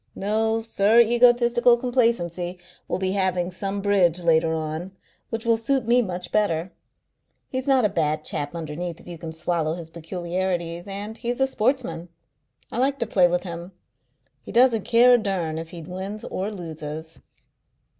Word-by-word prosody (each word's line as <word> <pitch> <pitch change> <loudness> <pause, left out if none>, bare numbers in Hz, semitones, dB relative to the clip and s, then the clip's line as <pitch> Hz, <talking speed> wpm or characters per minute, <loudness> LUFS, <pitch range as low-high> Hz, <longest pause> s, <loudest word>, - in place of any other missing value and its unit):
No, 220 +2 0
Sir 220 0 +3
Egotistical 240 +1 +5
Complacency 225 -8 0 0.3
will - - -1
be 185 0 -1
having 185 -2 0
some 195 +2 -3
bridge 180 -4 +2
later 165 -1 +3
on, 160 +3 -4 0.4
which 225 0 -4
will 230 -1 +3
suit 240 +1 0
me 245 +1 +5
much 180 -4 -5
better. 180 -4 +1 0.8
He's 260 +1 -4
not 265 -4 +4
a - - +6
bad 155 -5 -1
chap 145 +3 -3
underneath 165 +1 -5
if - - -17
you 170 -2 -8
can 160 0 -6
swallow 160 -1 -1
his 165 -2 -9
peculiarities, 175 +1 -3
and 205 +2 -5
he's 240 +1 -3
a 265 - +4
sportsman. 225 - -1 0.6
I 235 - -3
like 275 +2 +2
to 235 - -1
play 185 -5 +4
with 175 0 0
him. 175 +1 -7 0.7
He - - -10
doesn't 235 -3 +4
care 245 +1 +6
a 245 - +6
durn 180 -7 -2
if 165 0 -7
he 170 -2 -9
wins 190 +5 -6
or 195 +3 -3
loses." 160 -3 -7
185 Hz, 165 wpm, -24 LUFS, 170-230 Hz, 0.8 s, a